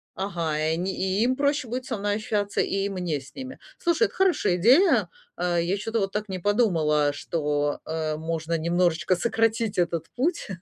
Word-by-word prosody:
ага, 170 -6 -2
и 155 +1 +1
они, 180 +3 -2
и 190 +3 0
им 255 +1 +2
проще 285 -2 +1
будет 250 +1 -3
со 235 - -3
мной 205 +1 -1
ощущаться, 205 -1 -2
и 195 0 -1
мне 180 -7 -2
с 135 - -15
ними. 260 0 -7 0.2
Слушай, 345 +5 +2
это - - -19
хорошая 360 - +2
идея. 245 - +5 0.3
Э, 175 -1 0
я 180 +4 0
чё-то 225 +3 -2
вот 195 0 -1
так 210 0 -3
не 185 -1 -3
подумала, 165 -8 +2
что, 145 -1 -1
э, 155 -1 -2
можно 165 +1 -2
немножечко 170 +2 +1
сократить 225 +2 0
этот 170 -2 0
путь. 330 +8 0
190 Hz, 180 wpm, -25 LUFS, 165-225 Hz, 0.3 s, идея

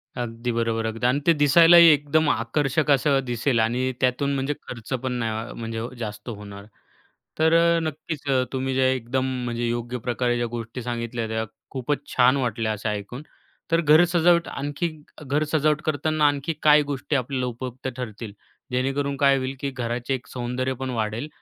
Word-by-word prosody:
अगदी 120 0 -3
बरोबर, 115 -1 -1
अगदी 110 +1 -3
आणि 130 +3 +2
ते 170 - +7
दिसायलाही 165 +3 +7
एकदम 150 +1 +3
आकर्षक 140 +5 0
असं 140 0 +3
दिसेल 120 0 0
आणि 125 +4 +1
त्यातून 130 +2 +1
म्हणजे 135 +2 -1
खर्च 120 +1 -7
पण 130 - -1
नाही 115 -1 -3
म्हणजे 115 0 -4 0.2
जास्त 105 0 -6
होणार. 100 -2 -9 0.7
तर 160 +1 +4
अ, 170 0 +4
नक्कीच, 155 -1 -5 0.3
तुम्ही 130 0 -1
जे 130 0 +3
एकदम 130 +1 -2 0.2
म्हणजे 120 0 -2
योग्य 120 +1 -3
प्रकारे 120 0 0
ज्या 120 - -1
गोष्टी 115 +1 -5
सांगितल्या, 120 -1 -3
त्या 110 0 -2 0.3
खूपच 140 +2 -3
छान 130 +2 +5
वाटल्या 115 -3 -1
असं 105 +1 -3
ऐकून. 105 +7 -5 0.5
तर 165 0 +3
घर 155 +2 +6
सजावट 170 0 +3
आणखी 145 +4 -3 0.4
घर 145 +3 +1
सजावट 155 -1 +2
करताना 155 0 +1
आणखी 145 +2 -1
काही 150 0 +7
गोष्टी 145 +1 -3
आपल्याला 130 0 -1
उपयुक्त 125 +1 -6
ठरतील, 110 -3 -6 0.4
जेणेकरून 135 +2 -1
काय 140 -1 +4
होईल, 130 +1 -3
की 140 - -2
घराचे 120 0 -3
एक 120 -2 -9
सौंदर्य 125 +1 -3
पण 130 - -2
वाढेल 115 +2 -2
130 Hz, 165 wpm, -24 LUFS, 115-145 Hz, 0.7 s, ते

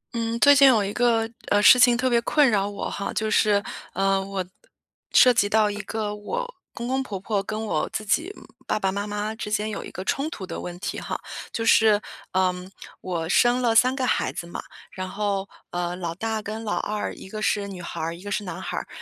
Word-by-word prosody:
嗯， 230 0 -1
最 285 +2 +7
近 275 0 +8
有 230 -6 +5
一 200 - -4
个， 230 -2 +2 0.2
呃， 205 - +4
事 250 - +9
情 245 -1 +6
特 255 +1 +1
别 240 -2 +3
困 295 +4 +3
扰 200 -1 +1
我 205 - -4
哈， 200 - -4
就 215 0 -1
是， 205 -1 +3 0.3
呃， 195 0 +1
我 190 -1 -4 0.7
涉 250 -1 +7
及 205 -3 +2
到 215 -1 +3
一 205 - -6
个 215 0 -3
我 485 - -4 0.2
公 235 - -6
公 265 +1 0
婆 210 -7 -5
婆 200 +1 -1
跟 215 +2 -4
我 210 - -1
自 215 - -4
己 320 - +1 0.4
爸 215 - 0
爸 190 -2 0
妈 200 +2 -3
妈 210 +1 -3
之 220 -2 -6
间 215 0 0
有 215 - -5
一 - - -8
个 185 - -6
冲 280 +8 0
突 205 - -7
的 - - -6
问 175 0 -6
题 - - -4
哈， - - -4 0.3
就 225 - -3
是， 220 -2 +5 0.3
嗯， 185 0 0 0.3
我 170 -3 -3
生 245 +5 +4
了 235 -2 +2
三 255 +3 +4
个 265 -2 -1
孩 - - +1
子 - - -6
嘛。 170 - -6 0.3
然 185 0 -5
后， 200 -1 -2 0.2
呃， 175 0 -2
老 170 -2 -4
大 220 +2 -2
跟 220 +2 -5
老 210 - -1
二， 210 0 -2
一 - - -11
个 215 +1 -6
是 205 -1 0
女 190 -3 -8
孩 170 - -6
儿， 165 +1 -3
一 170 - -13
个 205 - -6
是 210 - -1
男 180 - -6
孩 - - -4
儿， - - -4
210 Hz, 250 characters per minute, -24 LUFS, 195-230 Hz, 0.7 s, 事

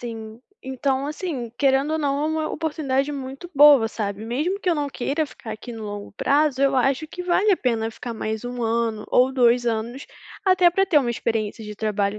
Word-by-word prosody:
Sim. 225 -1 -8 0.2
Então 265 +1 -1
assim, 300 - -4
querendo 275 +2 +2
ou 315 - 0
não, 285 0 0
é - - +1
uma 315 0 -1
oportunidade 295 -3 -1
muito 275 +5 -7
boa, 280 -5 +7
sabe, 210 -1 -4
mesmo 300 - -1
que 365 - -2
eu 340 - +3
não 290 -1 -1
queira 285 +3 -2
ficar 225 -5 -9
aqui 220 +3 -9
no 225 -1 -7
longo 205 -1 -6
prazo, 280 +3 +1
eu 275 -1 +3
acho 270 +4 +1
que 360 +3 -7
vale 370 +4 +3
a 370 - +3
pena 225 -3 -1
ficar 235 +1 -7
mais 220 +1 -4
1 245 -1 -5
ano 225 -1 -1
ou 255 +1 +4
2 245 -2 +3
anos, 235 +4 -3 0.4
até 370 -2 +5
para 390 +3 +2
ter 325 - +1
uma 245 -4 0
experiência 225 -2 -2
de 210 0 -7
trabalho 210 -1 -1
260 Hz, 205 wpm, -23 LUFS, 225-295 Hz, 0.4 s, boa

